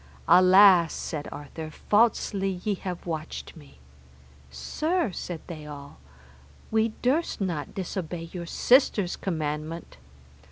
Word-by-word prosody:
Alas, 185 -2 +7
said 150 -2 -5
Arthur, 145 +2 -7
falsely 195 -1 +1
ye 210 - 0
have 185 -2 -6
watched 160 -2 -5
me. 70 -2 -16 0.7
Sir, 305 - -1
said 175 -2 -6
they 155 -3 -8
all, 140 - -10 0.7
we 220 0 +2
durst 290 +7 +1
not 170 -7 -3
disobey 175 -3 -4
your 175 -2 -6
sister's 220 -5 +3
commandment. 155 -1 -4
175 Hz, 110 wpm, -26 LUFS, 155-200 Hz, 0.7 s, Alas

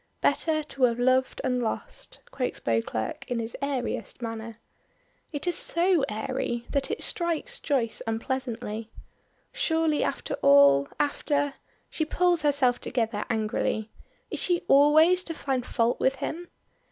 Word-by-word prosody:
"Better 310 -1 +2
to 275 -3 +1
have 235 -1 +1
loved 255 +1 +2
and 250 -1 0
lost," - - -5
quotes 255 -2 -3
Beauclerk 115 -1 -2
in 245 - -1
his 230 0 -3
airiest 280 -3 -3
manner. 225 -1 -5 0.8
It 290 0 -3
is 355 - +1
so 345 -2 +2
airy 240 +2 -3
that 280 -1 0
it 440 - -3
strikes 345 +8 -2
Joyce 255 -7 -1
unpleasantly. 225 -2 -3 0.6
Surely 320 -2 +1
after - - -3
all 140 0 +6
after 285 -1 0 0.4
She 315 - 0
pulls 350 +1 +2
herself 275 -4 +2
together 225 -4 -1
angrily. 220 0 -1 0.4
Is - - -2
she 350 -1 +1
always 310 +6 +6
to 330 - -4
find 265 -4 -1
fault 235 0 +1
with 265 +1 +2
him? 330 +6 -5
265 Hz, 135 wpm, -27 LUFS, 230-310 Hz, 0.8 s, all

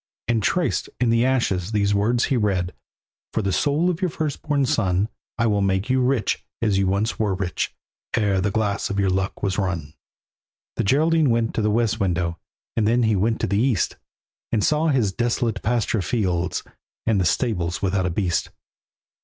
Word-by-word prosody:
And, 115 -2 +1
traced 175 - 0
in 120 -2 +2
the 115 0 +3
ashes, 110 -7 0
these 100 -1 +2
words 115 +4 +2
he 135 - +1
read: 95 -6 0 0.6
"For 110 - 0
the 100 - 0
soul 145 - +2
of 180 0 -1
your 185 - +1
firstborn 150 -2 -1
son, 100 -3 +1 0.3
I 115 - +2
will 105 -2 +2
make 95 +4 0
you 130 0 +3
rich 125 -5 +1 0.2
as 105 -4 +1
you 95 - +2
once 100 +4 0
were 105 -3 +1
rich 90 -1 -3 0.4
Ere 100 -4 +2
the 105 - +1
glass 100 -1 -1
of 100 - -1
your 95 -1 +2
luck 95 +1 -2
was 95 0 0
run." 85 -6 -2 0.8
The - - 0
Geraldine 155 +6 +3
went 115 -1 +1
to - - 0
the 105 - +2
west 115 +1 +1
window, 85 -4 -1 0.4
And 110 -2 +2
then 120 +2 +3
he 110 -1 +3
went 110 +4 +1
to - - +1
the 100 +2 +1
east, 120 -7 +1 0.5
And 110 -3 +1
saw 155 +2 +2
his 125 -10 +2
desolate 115 -1 -1
pasture 115 -2 0
fields, 90 -4 -1 0.4
And 110 -4 +2
the - - +2
stables 90 -2 0
without 95 -1 +1
a - - 0
beast. 90 -1 -1
105 Hz, 185 wpm, -23 LUFS, 95-120 Hz, 0.8 s, the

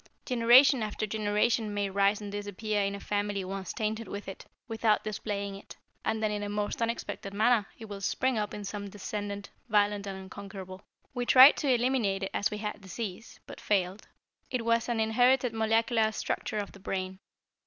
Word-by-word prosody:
Generation 250 +2 +6
after 215 0 -2
generation 215 +1 0
may 205 -1 0
rise 200 +2 +2
and 205 -1 -6
disappear 205 +1 -2
in 200 0 -1
a - - -7
family 205 -1 -2
once 190 -1 -5
tainted 220 +1 -3
with 200 0 -6
it, 195 - -8 0.2
without 225 -2 +1
displaying 200 -1 -3
it, 195 - -11 0.3
and 220 0 -1
then 215 - +1
in 210 0 -2
a 205 - -3
most 205 +2 -2
unexpected 230 -3 -3
manner 220 -1 +3
it 225 - -9
will 200 -2 -8
spring 260 +6 0
up 210 -1 -1
in 210 - -6
some 200 0 -5
descendant, 205 0 -5 0.2
violent 205 -1 +2
and 195 -1 -5
unconquerable. 190 0 -9 0.3
"We 245 -1 -3
tried 260 +3 +9
to 290 - -1
eliminate 235 -6 +1
it 195 - -3
as 205 - +1
we 210 - -5
had 210 -1 -5
disease, 195 +1 -7
but - - -11
failed. 195 -1 0 0.4
It 245 -3 -2
was 230 +1 +2
an 235 -2 0
inherited 245 +2 +3
molecular 225 0 +2
structure 215 - -3
of 205 -1 -3
the 195 - -14
brain. 185 -1 -4
210 Hz, 185 wpm, -29 LUFS, 200-225 Hz, 0.4 s, tried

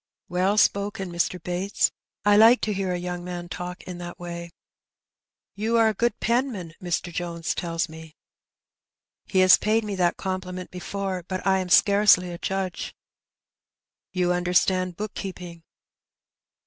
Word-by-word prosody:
'' - - -54
"Well 185 +3 +1
spoken, 200 -2 +1
Mr. 175 +1 -1
Bates. 180 +4 0 0.3
I 205 0 +6
like 225 +4 +7
to 215 - 0
hear 190 -1 -2
a 180 - -1
young 175 0 -4
man 175 -1 -6
talk 180 0 -6
in 180 -1 -8
that 175 0 -7
way. 170 -1 -6 1.0
You 225 +3 0
are 225 -1 +5
a - - -1
good 235 +1 0
penman, 230 -8 -1
Mr. 175 -1 -2
Jones 170 -1 -3
tells 165 -1 -2
me." 160 -1 -12 1.1
"He 190 - +3
has 185 0 +8
paid 220 +2 +2
me 210 -1 -4
that 175 -1 +2
compliment 185 -1 -4
before, 190 0 -4
but 185 -1 -4
I 190 -1 +3
am 185 -1 -4
scarcely 200 -2 +5
a 170 - -7
judge." 190 -2 -3 1.2
''You 180 -1 +1
understand 180 0 +1
bookkeeping?'' 185 -5 -6
185 Hz, 150 wpm, -25 LUFS, 175-200 Hz, 1.2 s, has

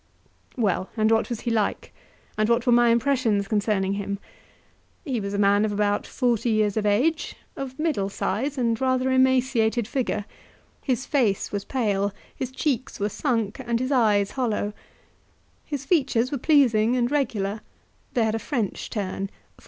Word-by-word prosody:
Well, 195 -5 0
and 215 0 +3
what 225 0 +2
was 235 -3 -4
he 235 - -2
like? 215 -3 -1 0.4
and 215 +1 +1
what 235 +1 +2
were 245 - +3
my 240 0 +5
impressions 230 -4 +2
concerning 205 -2 0
him? 200 0 -3 0.9
He 260 -6 -1
was 200 0 -3
a - - -1
man 200 +1 +4
of 215 - 0
about 205 0 0
forty 240 -2 0
years 215 -2 +2
of 215 -1 0
age, 265 +11 +1 0.2
of 265 -1 -6
middle 300 -12 0
size, 260 +9 -2
and 230 -2 0
rather 260 0 +1
emaciated 255 -3 +2
figure; 245 -6 -2 0.6
his 260 0 -1
face 225 -9 +1
was 200 -1 -3
pale, 205 -6 0 0.2
his 260 - -3
cheeks 260 -2 -2
were 205 +1 0
sunk, 225 -2 -1
and 235 -2 -1
his 255 +2 -2
eyes 210 -6 +3
hollow; 220 -5 -1 0.9
his 285 -2 -5
features 265 -6 +2
were 280 - -2
pleasing 245 -6 +4
and 245 0 +1
regular, 215 -8 -1 0.5
they 240 - +3
had 220 -1 +1
a 225 - -1
French 225 -6 -3
turn 195 -2 -3
(for - - -28
M. - - -30
230 Hz, 170 wpm, -25 LUFS, 205-260 Hz, 0.9 s, my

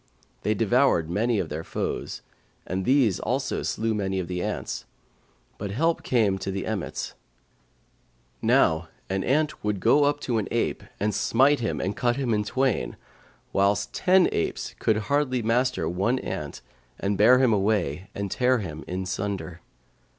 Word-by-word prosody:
They 105 - +1
devoured 115 - +2
many 115 +4 +1
of 85 -5 -2
their 80 +2 -4
foes, - - -4 0.4
and 95 +1 -3
these 125 -8 +3
also 130 +2 -1
slew 110 0 -1
many 95 -2 -1
of 90 - -3
the 90 0 -3
ants; - - -3 0.7
but 100 - -4
help 165 +11 +1
came 105 -6 +1
to 95 - -4
the 95 0 -3
emmets: 110 -5 -3 1.3
now 80 0 +3 0.2
an 95 0 0
ant 150 +4 0
would 105 -2 -1
go 145 +8 +4
up 145 0 +1
to 120 -5 0
an 105 - -3
ape - - -1 0.2
and 105 +1 0
smite 130 +8 +3
him 115 - -2
and 95 +2 -2
cut 120 -1 +1
him 130 -4 0
in 105 -1 +1
twain, 130 +2 0 0.6
whilst 100 +1 +1
ten 185 0 +4
apes 85 - -2
could 110 - +2
hardly 130 +1 0
master 125 +3 +1
one 100 +9 +1
ant - - -5 0.4
and 100 +1 0
bear 110 +6 +6
him 130 -3 +4
away 95 -5 0
and 100 -1 -3
tear 125 0 +3
him 80 -8 -6
in 95 +1 -3
sunder. 95 -2 -4
105 Hz, 160 wpm, -26 LUFS, 95-125 Hz, 1.3 s, bear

